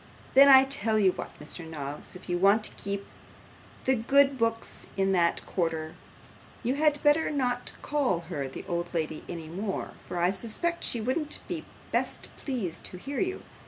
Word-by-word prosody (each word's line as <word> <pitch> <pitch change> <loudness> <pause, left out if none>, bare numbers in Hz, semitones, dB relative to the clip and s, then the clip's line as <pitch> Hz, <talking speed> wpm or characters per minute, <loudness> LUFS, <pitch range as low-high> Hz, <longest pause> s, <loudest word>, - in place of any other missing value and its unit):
'Then 275 +1 +9
I 265 -1 +10
tell 265 -5 +1
you 195 -3 +5
what, - - -6
Mr 175 - -5
Noggs, 150 0 -5
if 180 - -11
you 175 - 0
want 200 +4 +5
to - - 0
keep 200 0 -3
in - - -17 0.8
the 265 - +3
good 275 +4 +4
books 230 -2 -2
in 195 0 +2
that 170 -2 +2
quarter, 160 -3 -2 0.7
you 245 +2 +1
had 295 0 +2
better 295 +2 +4
not 250 -4 -1
call 275 -12 +1
her 160 -5 -4
the 130 - -8
old 175 0 -3
lady 155 -1 -2
any 165 -2 -6
more, 190 +4 -4 0.2
for 180 - -4
I 175 +1 +3
suspect 240 - -1
she 235 - +1
wouldn't 295 +6 -1
be - - -4 0.3
best - - -1
pleased 225 - -4
to 180 - -5
hear 275 +9 -5
you. 375 0 -1
215 Hz, 180 wpm, -28 LUFS, 175-270 Hz, 0.8 s, I